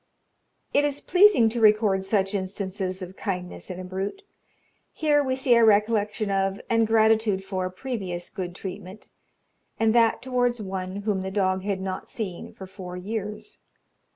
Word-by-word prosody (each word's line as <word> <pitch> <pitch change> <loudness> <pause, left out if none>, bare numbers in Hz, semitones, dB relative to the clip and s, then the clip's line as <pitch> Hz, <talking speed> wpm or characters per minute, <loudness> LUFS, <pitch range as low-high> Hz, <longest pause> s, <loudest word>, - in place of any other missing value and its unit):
It 285 - +4
is 290 -1 0
pleasing 365 - +5
to 235 +1 -3
record 210 -3 +4
such 195 0 0
instances 190 -1 -3
of 185 +1 -9
kindness 180 -2 -5
in 180 -1 -6
a - - -6
brute. 190 - -5 0.7
Here 295 -2 +2
we 260 -1 0
see 260 -1 +3
a 235 -1 +5
recollection 210 -1 +2
of, 195 0 0
and 230 -1 +3
gratitude 220 -3 +3
for, 185 -1 -3
previous 185 -5 -5
good 180 -2 -5
treatment, 190 +1 -8 0.7
and 225 -1 +3
that 230 -1 +4
towards 245 -2 0
one 190 0 -5
whom 205 -3 0
the 190 - -4
dog 190 -1 0
had 195 -1 -2
not 190 -1 -5
seen 195 -7 -5
for 190 - -10
four 185 -1 -8
years. 210 - -5
200 Hz, 155 wpm, -25 LUFS, 190-225 Hz, 0.7 s, pleasing